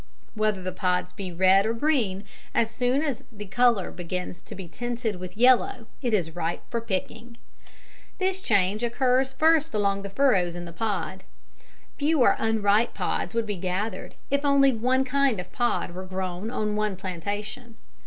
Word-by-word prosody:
Whether 215 -3 0
the 185 - -2
pods 180 -1 -1
be 195 -3 -5
red 190 +3 +5
or 225 +2 0
green, 230 -8 +1 0.3
as 225 -1 +2
soon 250 +5 +1
as 280 -6 -2
the 210 -2 -8
colour 235 -1 +2
begins 180 0 -5
to - - -10
be 190 -2 -8
tinted 240 +1 -3
with 185 +2 -8
yellow 245 -1 +4 0.2
it 245 - 0
is 175 -6 0
ripe 170 -1 -2
for 235 - -1
picking. 230 +3 -4 0.8
This 380 0 0
change 205 - +2
occurs 255 +2 +2
first 315 0 +3
along 200 -1 +1
the 200 - -6
furrows 195 -7 +2
in 175 0 -6
the 170 - -9
pod. 190 -1 -3 0.7
Fewer 295 -3 +4
unripe 220 0 +2
pods - - -2
would 230 -1 +1
be 205 -2 -3
gathered 185 +4 -3 0.2
if 280 +1 +1
only 280 -1 +5
one 255 +4 +2
kind 270 -4 +2
of 180 0 -7
pod 240 -6 0
were 185 +2 -7
grown 185 +2 -4
on 210 -3 -1
one 210 -2 0
plantation. 205 +6 -5
215 Hz, 165 wpm, -26 LUFS, 185-245 Hz, 0.8 s, red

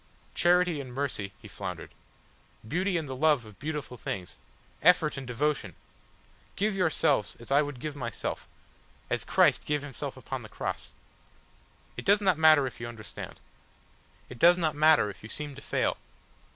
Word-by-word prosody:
"Charity 175 -3 +3
and 130 -2 -9
mercy," 130 -8 -2
he - - -9
floundered; - - -6 0.8
"beauty 180 - 0
and 160 -3 -3
the 130 - -5
love 145 -3 +3
of 105 -2 -14
beautiful 150 -4 -4
things 95 -4 -5 0.4
effort 180 -4 +5
and 135 -2 -6
devotion! 125 - -1 0.8
Give 210 0 0
yourselves 160 - +1
as 120 - -12
I 140 +2 +6
would 145 -4 -4
give 150 +2 -5
myself 140 - -4 0.6
as - - 0
Christ - - +4
gave 150 -1 -1
Himself 140 -3 -6
upon - - -5
the - - -11
Cross. - - -4 1.1
It - - -6
does 200 +1 +5
not 185 -6 +2
matter 155 -3 +7
if 130 - -6
you 120 - -4
understand. 115 -2 -9 0.9
It 125 - -11
does 175 +1 +7
not 160 -4 +1
matter 150 -8 +5
if - - -16
you 110 - -10
seem 150 +2 -5
to 140 - -11
fail. - - 0
145 Hz, 165 wpm, -29 LUFS, 125-160 Hz, 1.1 s, matter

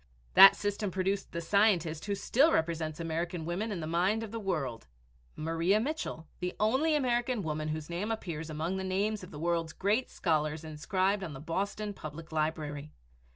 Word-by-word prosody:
That 195 0 +10
system 205 0 -2
produced 190 +2 -1
the 170 - -3
scientist, 170 -4 +2
who 200 -1 -1
still 270 +10 +3
represents 160 -1 0
American 165 0 -3
women 190 +7 -2
in 185 -5 -3
the - - -3
mind 185 +7 +1
of 220 - -7
the 230 - -4
world, 155 - -3 0.5
Maria 165 +6 +1
Mitchell, 245 - -3
the 180 0 -3
only 265 +9 +3
American 245 -4 +1
woman 155 -1 -2
whose 155 -1 -3
name 175 +5 -3
appears 165 -8 -4
among 160 +5 -2
the 190 - -3
names 195 +2 -1
of 180 - -9
the 150 - -9
world's 165 0 -1
great 210 +6 +1
scholars 155 -2 0
inscribed 185 +6 0
on 165 -5 -5
the 135 - -8
Boston 200 +7 -3
Public 155 -2 -9
Library. 155 -2 -2
175 Hz, 175 wpm, -31 LUFS, 160-205 Hz, 0.5 s, That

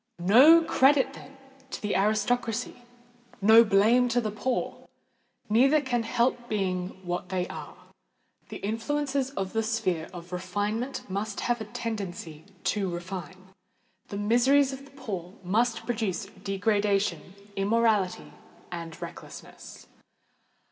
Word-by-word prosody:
No 255 - +7
credit, 270 -2 +3
then, 275 +1 -13 0.3
to - - -5
the 210 -1 -2
aristocracy—no 240 +1 +1
blame 225 +4 +4
to 240 +1 +2
the 215 -3 -2
poor! 245 +4 -3 0.6
Neither 265 +8 +4
can 255 -4 -1
help 240 +1 0
being 185 -2 -2
what 175 0 -3
they 180 -1 -1
are. - - -8 0.7
The - - -6
influences 270 +5 -1
of 195 -9 -4
the 225 - +1
sphere 190 -7 -1
of 175 -1 -10
refinement 205 +7 -3
must 200 +2 -3
have 240 -1 0
a - - -4
tendency 200 -9 -6 0.2
to 200 -3 0
refine: 185 +1 -7 0.6
the 200 - -6
miseries 260 +6 +3
of 270 +1 -9
the 275 - -17
poor 190 -7 -6
must 225 +5 0
produce 220 -4 -2
degradation, 195 -3 -1 0.2
immorality, 205 -1 +1 0.4
and 165 -2 -7
recklessness. - - -10
215 Hz, 120 wpm, -27 LUFS, 190-245 Hz, 0.7 s, No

